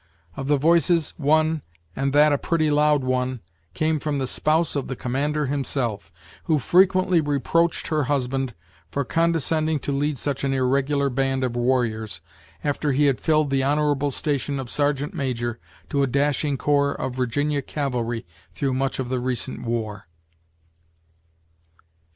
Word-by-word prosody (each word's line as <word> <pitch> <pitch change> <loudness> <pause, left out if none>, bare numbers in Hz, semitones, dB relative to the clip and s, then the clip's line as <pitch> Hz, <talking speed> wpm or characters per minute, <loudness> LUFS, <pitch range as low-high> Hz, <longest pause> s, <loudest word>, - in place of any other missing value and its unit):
Of 135 - -5
the 145 0 +3
voices, 165 +2 +3
one, 155 +1 +2 0.3
and 135 0 0
that 150 +1 +5
a 140 - +1
pretty 155 -3 +1
loud 150 -1 +3
one', 130 0 -1 0.4
came 155 0 +1
from 145 0 -2
the 135 - -1
spouse 155 +5 +1
of 140 - -2
the 130 - -4
commander 145 +5 -1
himself, 125 - -2 0.3
who 160 -2 +3
frequently 185 +4 +4
reproached 155 +4 0
her 155 -3 +1
husband 135 -2 -1 0.3
for 140 +7 -2
condescending 160 -1 +1
to - - -2
lead 145 +1 0
such 135 +4 -3
an 135 -1 +1
irregular 140 +2 +1
band 135 0 0
of 125 -2 -1
warriors, 115 -6 0 0.4
after 145 0 0
he 145 +3 +3
had 135 -6 +1
filled 155 -3 +2
the 135 -1 +2
honorable 145 0 +1
station 140 0 -2
of 130 -3 -6
sergeant 145 0 0
major 120 -4 -2 0.3
to 140 -2 +1
a 140 - +2
dashing 140 +1 +1
corps 140 0 +2
of 130 -1 -3
Virginia 140 +4 0
cavalry 120 -5 -3 0.3
through 135 -3 -1
much 135 +1 -1
of 130 -2 -3
the 130 -1 0
recent 125 +1 -3
war. 110 -5 -3
140 Hz, 150 wpm, -23 LUFS, 130-150 Hz, 0.4 s, that